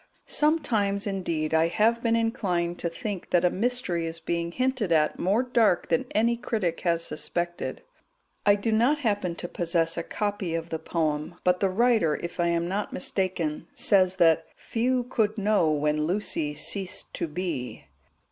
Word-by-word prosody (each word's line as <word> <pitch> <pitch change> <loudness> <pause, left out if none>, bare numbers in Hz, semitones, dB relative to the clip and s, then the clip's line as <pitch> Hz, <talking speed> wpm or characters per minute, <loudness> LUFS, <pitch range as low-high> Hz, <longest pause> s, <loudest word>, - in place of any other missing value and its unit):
Sometimes, 220 -10 +1
indeed, 170 -6 -2
I 160 +1 +4
have 225 +7 +2
been 230 -1 +2
inclined 185 -7 -1
to 170 - -1
think 205 0 -5
that 175 0 +3
a 175 - +3
mystery 200 -6 -1
is 165 0 -6
being 170 +1 -2
hinted 255 -3 -1
at 155 -2 +2
more 205 +7 +2
dark 230 -8 +2
than 165 - +1
any 230 +2 +3
critic 205 -8 -2
has 170 -1 +1
suspected. 175 +1 -3 0.6
I 205 -1 +5
do 205 +3 -2
not 245 +7 +3
happen 205 -7 0
to 175 - -5
possess 170 -1 0
a - - -3
copy 205 -5 -2
of 165 0 -4
the 160 - -3
poem, 160 0 -2
but 180 0 +3
the 195 - +2
writer, 215 -6 +3
if 170 0 -6
I 170 - +2
am 170 0 0
not 200 +3 -2
mistaken, 180 -5 -2
says 190 -2 +3
that 165 -4 +4
"few 250 +2 0
could 220 -3 0
know 205 -5 +2
when 150 0 +1
Lucy 165 -5 -1
ceased 185 +6 -2
to - - -2
be." 150 - -4
180 Hz, 165 wpm, -26 LUFS, 165-215 Hz, 0.6 s, I